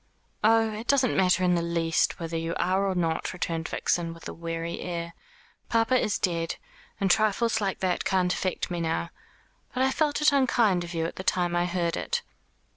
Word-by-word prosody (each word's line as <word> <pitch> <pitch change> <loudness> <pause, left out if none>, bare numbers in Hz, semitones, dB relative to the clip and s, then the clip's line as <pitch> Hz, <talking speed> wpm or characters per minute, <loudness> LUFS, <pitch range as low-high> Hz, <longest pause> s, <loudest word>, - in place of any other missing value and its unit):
"Oh, 225 0 +4
it 220 +3 -7
doesn't 265 -4 +3
matter 185 -1 +3
in 180 -1 +3
the 170 - +2
least 170 -1 0
whether 165 -1 -4
you 165 0 -2
are 190 +2 +1
or 190 - -1
not," 165 -1 -1
returned 165 -2 -3
Vixen, 165 -1 -1
with 165 - -10
a - - -6
weary 165 0 -4
air. 170 -1 -4 0.6
"Papa 230 +2 +2
is 215 -4 +1
dead, 170 -3 -1 0.4
and 195 -3 +2
trifles 220 +2 +2
like 195 -2 -2
that 185 -2 0
can't 180 -1 +1
affect 185 -1 -2
me 175 -1 -2
now. 165 +1 -1 0.6
But 255 - +2
I 265 - +3
felt 295 0 +1
it 300 0 +5
unkind 235 -9 +3
of 175 0 -7
you 165 0 0
at 165 - -5
the 185 - -5
time 175 -2 +1
I 175 0 +1
heard 170 -1 -1
it." 480 0 -2
180 Hz, 195 wpm, -27 LUFS, 170-220 Hz, 0.6 s, it